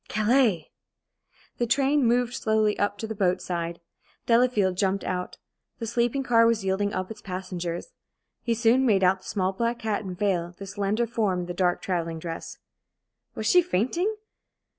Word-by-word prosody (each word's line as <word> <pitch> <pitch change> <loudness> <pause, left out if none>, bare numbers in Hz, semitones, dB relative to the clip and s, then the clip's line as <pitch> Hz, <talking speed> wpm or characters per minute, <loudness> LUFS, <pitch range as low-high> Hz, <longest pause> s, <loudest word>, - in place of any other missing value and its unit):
Calais! 215 - +2 0.9
The 240 - +1
train 275 +3 +2
moved 245 +1 +2
slowly 220 -4 +1
up 205 0 0
to 220 - -4
the 220 - -4
boat 185 -3 +1
side. 170 -1 -4 0.5
Delafield 230 -6 +3
jumped 195 0 0
out. 180 0 -3 0.4
The 230 - -4
sleeping 240 +4 0
car 230 -3 +4
was 225 -4 +1
yielding 195 +2 0
up 185 +1 -3
its 215 -1 -9
passengers. 180 - -5 0.5
He 235 -1 0
soon 235 +3 +3
made 205 -7 +3
out 185 +1 +4
the - - -11
small 190 -2 0
black 235 +3 -2
hat 215 -1 0
and 185 -2 -6
veil, 180 -4 -1
the 200 - -7
slender 200 +4 -1
form 210 -6 0
in - - -4
the 175 - -5
dark 180 0 0
travelling 165 -3 -2
dress. 165 0 -6 0.8
Was - - -4
she 360 - +6
fainting? 345 - 0
205 Hz, 170 wpm, -26 LUFS, 185-235 Hz, 0.9 s, she